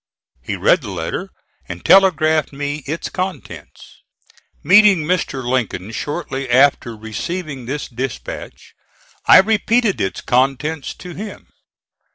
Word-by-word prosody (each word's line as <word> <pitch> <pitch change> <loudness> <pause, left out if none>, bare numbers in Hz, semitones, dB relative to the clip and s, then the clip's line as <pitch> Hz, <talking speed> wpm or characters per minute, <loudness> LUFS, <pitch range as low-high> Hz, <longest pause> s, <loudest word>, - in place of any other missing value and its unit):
He - - -4
read - - +3
the - - -7
letter - - -4 0.4
and 90 0 -8
telegraphed 160 -5 +4
me 145 +1 -4
its 155 +4 -3
contents. 185 0 -7 0.6
Meeting 195 0 +6
Mr. 150 -6 -2
Lincoln 115 -6 -2
shortly 135 +1 -4
after 125 -3 +3
receiving 135 +5 -5
this 145 +3 -4
dispatch, 120 - -7 0.5
I - - +9
repeated 220 +1 +1
its 95 - -2
contents 135 +4 0
to 180 - -10
him. 210 +3 -9
145 Hz, 115 wpm, -19 LUFS, 130-180 Hz, 0.6 s, I